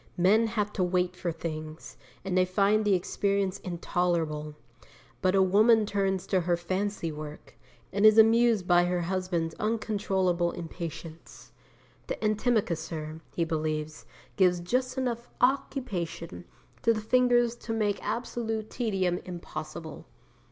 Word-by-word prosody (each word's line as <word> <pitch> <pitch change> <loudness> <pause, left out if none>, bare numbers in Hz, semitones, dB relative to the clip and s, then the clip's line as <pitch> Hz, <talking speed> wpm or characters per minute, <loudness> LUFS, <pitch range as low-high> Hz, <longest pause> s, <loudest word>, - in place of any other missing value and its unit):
Men 210 +6 +4
have 210 -2 -2
to 185 - 0
wait 180 0 0
for 180 -1 -3
things, 155 -1 -7 0.3
and 190 -1 -1
they 185 - +5
find 200 +3 +2
the 200 -2 +4
experience 195 +1 -1
intolerable. 170 -4 -2 0.7
But 185 +1 +2
a 190 - +5
woman 215 +4 +5
turns 195 -2 -1
to 190 -2 +1
her 175 0 +1
fancy 185 0 -2
work, 150 0 -9 0.4
and 200 +2 0
is 215 0 +7
amused 225 -2 +5
at 175 0 +5
her 180 0 0
husband's 175 -2 -2
uncontrollable 195 -5 0
impatience. 165 -1 -8 0.6
The - - -2
antimacassar, 170 -8 -1
he 170 - +1
believes, 155 -1 -3 0.3
gives 180 -2 +4
just 255 +8 -1
enough 240 -2 -2
occupation 190 - -1 0.4
to 230 0 +3
the 215 - -3
fingers 240 +1 +3
to 235 - -7
make 210 -2 0
absolute 225 -2 -3
tedium 190 -7 0
impossible. 160 -3 -8
185 Hz, 130 wpm, -28 LUFS, 170-215 Hz, 0.7 s, is